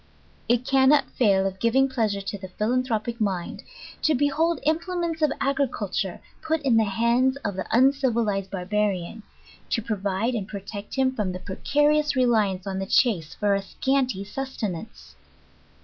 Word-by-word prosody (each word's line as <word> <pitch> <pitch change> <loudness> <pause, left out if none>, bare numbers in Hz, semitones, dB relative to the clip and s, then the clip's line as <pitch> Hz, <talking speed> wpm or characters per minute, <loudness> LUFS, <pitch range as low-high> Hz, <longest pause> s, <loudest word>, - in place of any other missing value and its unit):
It 240 +1 +2
cannot 270 +2 +4
fail 195 -5 +3
of 190 0 -3
gmn^ 265 +5 +3
pleasure 215 -5 0
to 195 +1 -5
the 190 - -7
philanthropic 235 +2 -1
mind, 190 -4 -2 0.4
to 310 - +3
behold 310 +5 +1
implements 335 +1 -1
of 305 -2 +3
agriculture 255 -9 -1 0.2
put 320 0 0
in 260 -4 +3
the 220 - +4
hands 235 +6 +2
of 205 -2 -2
the 190 - -4
uncivilized 235 -6 +2
barbarian, 195 +1 -2 0.5
to - - +1
provide 205 +2 -1
and 210 -5 -3
protect 200 0 -7
him 265 -1 +2
from 205 -7 -2
the 180 - -5
precarious 295 +10 +1
reliance 215 -7 +2
on 190 -1 -3
the 195 - -3
chase 185 - +2
for 205 -1 +1
a 200 - +1
scanty 255 0 -1
sustenance. 215 -4 -6
225 Hz, 150 wpm, -25 LUFS, 195-270 Hz, 0.5 s, cannot